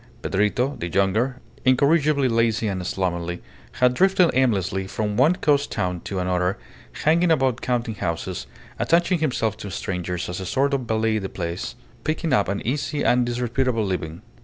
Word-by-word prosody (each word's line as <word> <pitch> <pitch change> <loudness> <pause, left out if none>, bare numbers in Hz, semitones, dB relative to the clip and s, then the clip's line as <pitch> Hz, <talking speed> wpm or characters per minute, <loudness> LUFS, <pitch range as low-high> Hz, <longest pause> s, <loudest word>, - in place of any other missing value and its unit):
Pedrito, 120 +8 0
the 85 - -3
younger, 110 +8 +1 0.2
incorrigibly 140 +2 +3
lazy 115 -2 +1
and 95 -3 -3
slovenly, 85 -2 -2 0.3
had 125 0 +3
drifted 185 +3 +4
aimlessly 95 -7 +1
from 105 +1 -2
one 145 +10 +4
coast 145 -4 +1
town 90 -4 -1
to 95 - -5
another, 90 0 0 0.5
hanging 170 +3 +4
about 130 -6 +2
counting 120 -2 -1
houses, 90 -1 -4 0.3
attaching 175 +1 +2
himself 120 -8 0
to 105 -2 -7
strangers 90 -2 -3
as 90 +1 -4
a 95 - -5
sort 140 +7 +1
of 135 - +1
valet 110 0 +1
de 95 -2 -5
place, 85 +5 -4 0.3
picking 155 -1 -1
up 105 -6 +3
an 100 +1 -3
easy 145 +4 -1
and 125 0 +3
disreputable 120 -1 0
living. 85 -4 -4
115 Hz, 160 wpm, -23 LUFS, 95-135 Hz, 0.5 s, drifted